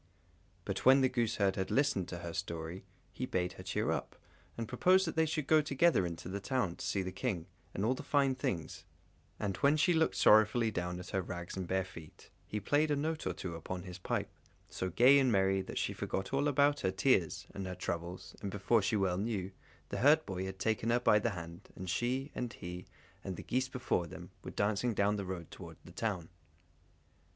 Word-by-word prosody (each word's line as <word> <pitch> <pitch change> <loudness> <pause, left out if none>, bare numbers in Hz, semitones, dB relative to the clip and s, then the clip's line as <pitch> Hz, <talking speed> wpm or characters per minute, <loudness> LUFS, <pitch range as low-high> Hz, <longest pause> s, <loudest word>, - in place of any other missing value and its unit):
But - - -3
when 135 +1 +7
the 130 - +4
gooseherd 110 -5 +1
had 95 - -1
listened 130 -10 +1
to 90 - -5
her 85 - -5
story, 85 0 -5 0.3
he 130 - -4
bade 90 -4 -1
her - - -10
cheer - - -1
up, - - -3 0.4
and 115 -1 -3
proposed 185 - +4
that 165 - -3
they 160 0 +3
should 155 -2 -1
go 155 +2 +5
together 145 - +3
into 85 0 -7
the 100 +2 -3
town 105 -5 -1
to - - -6
see 100 - 0
the 95 - -4
King, 95 -4 -2 0.3
and 100 - -2
all 125 - +3
the - - -6
fine 140 -2 +2
things; 90 - -3 0.6
and 100 -3 -2
when 145 +2 +4
she 175 +4 +4
looked 160 -1 +2
sorrowfully 110 +2 +5
down 90 -2 -3
at 90 - -8
her 95 - 0
rags 85 -1 -6
and 95 -2 -4
bare 95 +1 0
feet, 85 -5 -13 0.2
he 105 - -3
played 145 +9 +2
a 145 - +2
note 155 +2 -2
or - - 0
two 90 -3 -5
upon 90 +2 -5
his 90 -1 -8
pipe, - - -2 0.4
so 95 - -3
gay 125 +10 +6
and 130 -2 +3
merry, 95 -1 +3
that - - -7
she - - 0
forgot 95 +6 -3
all 140 +2 +2
about 145 +1 +3
her 95 - +1
tears 95 - +2
and 95 -1 -5
her 90 - -4
troubles, 85 +1 -5
and 100 - -3
before 105 +3 +2
she 100 - 0
well 95 -3 +1
knew, 100 -3 -2 0.4
the - - -3
herdboy 125 -10 +3
had 95 0 -6
taken 110 +3 0
her 120 +1 +3
by 105 -3 +5
the 115 - 0
hand, 85 -3 -8
and 95 -1 -4
she, 130 +8 -1
and 120 -2 -4
he, 90 0 -7 0.4
and 95 - -4
the - - -8
geese 130 +1 0
before 120 -9 -1
them, - - -10
were - - -6
dancing 110 +3 0
down 100 +1 +2
the 100 -2 -3
road 90 -3 -6
towards - - -10
the - - -11
town. 95 -7 -2
100 Hz, 215 wpm, -33 LUFS, 90-130 Hz, 0.6 s, when